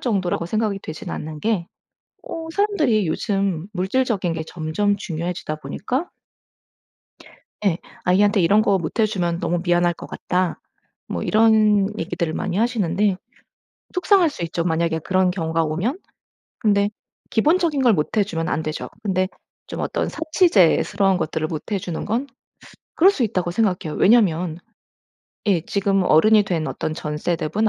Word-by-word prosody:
정도라고 185 Hz, -7 st, -1 dB
생각이 215 Hz, 0 st, -1 dB
되진 155 Hz, 0 st, -7 dB
않는 155 Hz, 0 st, -6 dB
게 210 Hz, -6 st, 0 dB, 0.6 s
어 330 Hz, -8 st, -5 dB
사람들이 310 Hz, -, +2 dB
요즘 195 Hz, -1 st, -1 dB
물질적인 190 Hz, -1 st, 0 dB
게 160 Hz, -1 st, -4 dB
점점 180 Hz, +5 st, -1 dB
중요해지다 170 Hz, -3 st, -4 dB
보니까 250 Hz, -, -3 dB, 1.6 s
예. 180 Hz, -4 st, +2 dB, 0.3 s
"아이한테 200 Hz, +3 st, +3 dB
이런 200 Hz, +5 st, +4 dB
거 200 Hz, -3 st, +2 dB
못 170 Hz, +6 st, -3 dB
해주면 180 Hz, -6 st, 0 dB
너무 175 Hz, 0 st, 0 dB
미안할 175 Hz, -1 st, +2 dB
것 -, -, -10 dB
같다." 180 Hz, -1 st, -2 dB, 0.5 s
뭐 -, -, -4 dB
이런 215 Hz, -2 st, +4 dB
얘기들을 170 Hz, 0 st, -2 dB
많이 185 Hz, -1 st, -2 dB
하시는데 205 Hz, -4 st, +1 dB, 0.8 s
속상할 360 Hz, -2 st, +4 dB
수 280 Hz, -, -7 dB
있죠, 170 Hz, 0 st, -2 dB
만약에 165 Hz, -1 st, 0 dB
그런 185 Hz, +2 st, +2 dB
경우가 165 Hz, -2 st, -1 dB
오면. 180 Hz, -, -2 dB, 0.6 s
근데 205 Hz, -1 st, +2 dB, 0.4 s
기본적인 305 Hz, +3 st, +2 dB
걸 240 Hz, -4 st, +5 dB
못 155 Hz, +5 st, -1 dB
해주면 170 Hz, -6 st, 0 dB
안 160 Hz, -, -1 dB
되죠. 155 Hz, 0 st, -4 dB
근데 185 Hz, -2 st, +1 dB, 0.4 s
좀 -, -, -5 dB
어떤 -, -, -1 dB
사치제스러운 205 Hz, -, +3 dB
것들을 160 Hz, -1 st, -2 dB
못 160 Hz, +7 st, -6 dB
해주는 180 Hz, -4 st, -3 dB
건 235 Hz, +6 st, -1 dB, 0.7 s
그럴 375 Hz, +4 st, +6 dB
수 295 Hz, -11 st, -1 dB
있다고 185 Hz, -6 st, -1 dB
생각해요. 180 Hz, -6 st, -1 dB
왜냐하면 180 Hz, -7 st, +3 dB, 0.9 s
예 190 Hz, -5 st, +3 dB
지금 200 Hz, -1 st, +1 dB
어른이 210 Hz, +7 st, +5 dB
된 165 Hz, -5 st, -1 dB
어떤 155 Hz, -, -3 dB
전 150 Hz, -1 st, -4 dB
세대분 175 Hz, +7 st, 0 dB
190 Hz, 310 characters per minute, -22 LUFS, 170-220 Hz, 1.6 s, 그럴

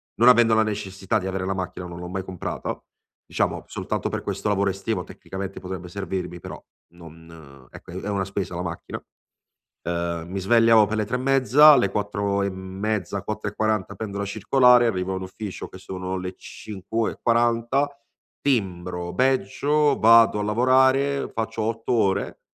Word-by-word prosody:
non 120 Hz, -, +4 dB
avendo 120 Hz, -2 st, +6 dB
la 110 Hz, -, +4 dB
necessità 100 Hz, 0 st, -2 dB
di 95 Hz, -, -5 dB
avere 95 Hz, 0 st, -3 dB
la 95 Hz, -, -1 dB
macchina 90 Hz, -1 st, -5 dB
non 85 Hz, 0 st, -9 dB
l'ho 90 Hz, -, -6 dB
mai 95 Hz, +1 st, -4 dB
comprata, 95 Hz, -2 st, -5 dB, 0.4 s
diciamo -, -, -1 dB
soltanto -, -, -3 dB
per -, -, -3 dB
questo -, -, -3 dB
lavoro 100 Hz, -1 st, +2 dB
estivo 95 Hz, 0 st, -3 dB
tecnicamente 95 Hz, 0 st, -7 dB
potrebbe 90 Hz, -1 st, -7 dB
servirmi, 95 Hz, -2 st, -4 dB
però -, -, -9 dB, 0.3 s
non 80 Hz, -5 st, -14 dB
ecco -, -, -13 dB
è -, -, -9 dB
è -, -, -7 dB
una 100 Hz, -1 st, 0 dB
spesa 95 Hz, -2 st, -4 dB
la 90 Hz, -, -3 dB
macchina, 85 Hz, -1 st, -6 dB, 0.8 s
uhm, 85 Hz, 0 st, -3 dB
mi 95 Hz, 0 st, -3 dB
svegliavo 115 Hz, +1 st, +5 dB
per 110 Hz, +1 st, -2 dB
le 105 Hz, -, 0 dB
3 125 Hz, -, -1 dB
e -, -, -4 dB
mezza, 135 Hz, +3 st, +5 dB
alle 100 Hz, -8 st, +4 dB
4 100 Hz, -1 st, -1 dB
e 100 Hz, -, 0 dB
mezza, 95 Hz, +1 st, -3 dB
4 105 Hz, 0 st, -4 dB
e -, -, -19 dB
40 110 Hz, -3 st, -1 dB
prendo 100 Hz, -2 st, -5 dB
la 100 Hz, -, -2 dB
circolare, 125 Hz, +4 st, +4 dB
arrivo 95 Hz, -3 st, -1 dB
all'ufficio 95 Hz, +2 st, -6 dB
che 95 Hz, -, -12 dB
sono 95 Hz, 0 st, -5 dB
le 90 Hz, 0 st, -5 dB
5 110 Hz, +2 st, -4 dB
e -, -, -14 dB
40, 120 Hz, +4 st, +2 dB, 0.5 s
timbro, 90 Hz, -8 st, -1 dB
badgio, 135 Hz, +5 st, +2 dB
vado 115 Hz, -1 st, +6 dB
a -, -, -1 dB
lavorare, 130 Hz, +5 st, +2 dB
faccio 115 Hz, 0 st, -3 dB
8 115 Hz, +2 st, -2 dB
ore, 100 Hz, -5 st, 0 dB
100 Hz, 170 wpm, -24 LUFS, 95-115 Hz, 0.8 s, avendo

